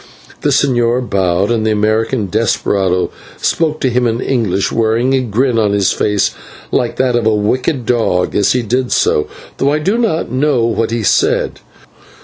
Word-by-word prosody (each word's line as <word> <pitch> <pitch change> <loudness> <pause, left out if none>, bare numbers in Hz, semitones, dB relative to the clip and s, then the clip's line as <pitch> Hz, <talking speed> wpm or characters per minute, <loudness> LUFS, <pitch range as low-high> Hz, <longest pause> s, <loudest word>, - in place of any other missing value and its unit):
The - - +1
señor 120 -2 +1
bowed, 95 +1 0
and 115 -2 0
the 110 - +1
American 110 +2 0
desperado 95 -3 0 0.3
spoke 155 -2 0
to 130 - +2
him 125 0 +1
in 115 0 -1
English, 110 -8 -1
wearing 115 +3 +1
a 135 - +2
grin 120 +1 0
on 105 -2 +1
his 100 -2 +2
face 105 -2 0 0.4
like 120 - 0
that 130 -2 +1
of 120 -2 +1
a 110 - +3
wicked 125 +5 -1
dog 110 -7 0
as 100 - +2
he 125 -1 0
did 125 +3 -1
so, 75 - +1 0.3
though 140 +1 +1
I 150 - +1
do 195 +10 0
not 205 - -1
know 130 -2 +1
what 115 -1 0
he 115 -1 -2
said. - - +1
115 Hz, 175 wpm, -15 LUFS, 105-130 Hz, 0.4 s, a